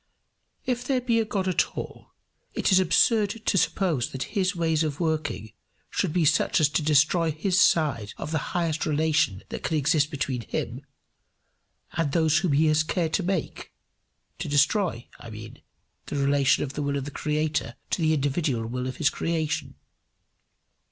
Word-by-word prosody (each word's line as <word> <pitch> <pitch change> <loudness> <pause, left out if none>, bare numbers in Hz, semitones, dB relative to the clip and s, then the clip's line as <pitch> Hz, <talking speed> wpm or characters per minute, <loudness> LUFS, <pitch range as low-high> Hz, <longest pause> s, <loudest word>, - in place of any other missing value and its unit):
If 245 -1 -1
there 260 0 0
be 240 -2 +1
a 225 - +1
God 195 -3 -2
at 185 - 0
all, - - -8 0.4
it - - +1
is 185 - +6
absurd 205 +5 +2
to - - +1
suppose 165 -5 +1
that 130 -1 -3
his 190 -2 +1
ways 160 -2 +1
of 150 -2 -3
working 155 - -2 0.4
should 185 - 0
be 170 0 +1
such - - +3
as 150 -2 +4
to 155 - 0
destroy 155 +3 +3
his 180 +5 +1
side 130 - +2
of 150 - -6
the 160 - 0 0.2
highest 165 -3 -1
relation 150 -10 +1
that - - -5
can 160 - -1
exist 150 0 +2
between 135 -4 -3
him 120 +2 -4 1.1
and 165 -4 -1
those 160 -1 +3
whom 175 -5 0
he 150 +3 +3
has 155 0 +3
cared 160 0 -1
to - - +2
make 185 -2 -3 0.7
to 160 -2 -4
destroy, 145 - +1
I 120 - -10
mean, 110 0 -10 0.5
the - - -5
relation 140 -1 +2
of 135 - -5
the 150 - -4
will 140 0 -1
of 135 - -4
the 145 - -6
creator 150 -4 -2 0.2
to - - 0
the 160 -1 +3
individual 140 -4 -1
will 125 +2 -3
of 130 - -6
his - - +2
creature. 160 -2 -2
155 Hz, 175 wpm, -26 LUFS, 140-175 Hz, 1.1 s, is